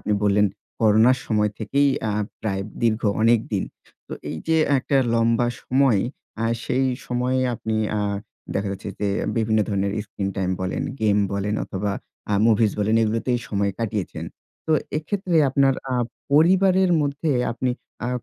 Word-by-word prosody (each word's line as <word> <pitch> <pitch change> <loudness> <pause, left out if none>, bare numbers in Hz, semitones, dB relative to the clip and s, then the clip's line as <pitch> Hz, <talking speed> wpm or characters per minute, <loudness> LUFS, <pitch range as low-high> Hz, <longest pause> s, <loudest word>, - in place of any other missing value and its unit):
আপনি 105 - -1
বললেন 105 0 +4 0.3
করোনার 110 +4 +5
সময় 105 -1 +1
থেকেই 140 +6 +2 0.2
আ - - -1 0.3
প্রায় 100 -3 -2 0.2
দীর্ঘ 115 -1 +2 0.2
অনেক 115 +1 +5
দিন। 95 - 0 0.4
তো - - -7 0.2
এই - - -4
যে 160 - +4 0.2
একটা 140 +2 0 0.2
লম্বা 115 +1 +2 0.2
সময়। 130 -5 +3 0.4
আ - - +1 0.2
সেই 130 +1 +1 0.2
সময়ে 125 +1 0
আপনি 110 -1 -3 0.2
আ - - 0 0.5
দেখা 100 0 -1
যাচ্ছে 95 - -7
যে 105 - +1 0.3
বিভিন্ন 110 -1 +2
ধরনের 100 -1 0
স্ক্রিন 100 -1 -4
টাইম 95 -1 0
বলেন, 95 0 -2 0.2
গেম 105 -1 +3
বলেন 100 +1 -1
অথবা 100 +1 -3 0.4
আ - - +1
মুভিজ 110 -2 +3
বলেন 105 +2 +1
এগুলোতেই 115 +3 0
সময় 100 -1 0
কাটিয়েছেন। 110 -4 -3 0.4
তো 160 - +2 0.3
এক্ষেত্রে 180 +1 -1
আপনার 135 0 +3 0.2
আ - - +1 0.4
পরিবারের 185 +4 +4
মধ্যে 145 +2 -1 0.2
আপনি 125 +2 -1 0.4
আ - - -1
115 Hz, 150 wpm, -23 LUFS, 105-130 Hz, 0.5 s, করোনার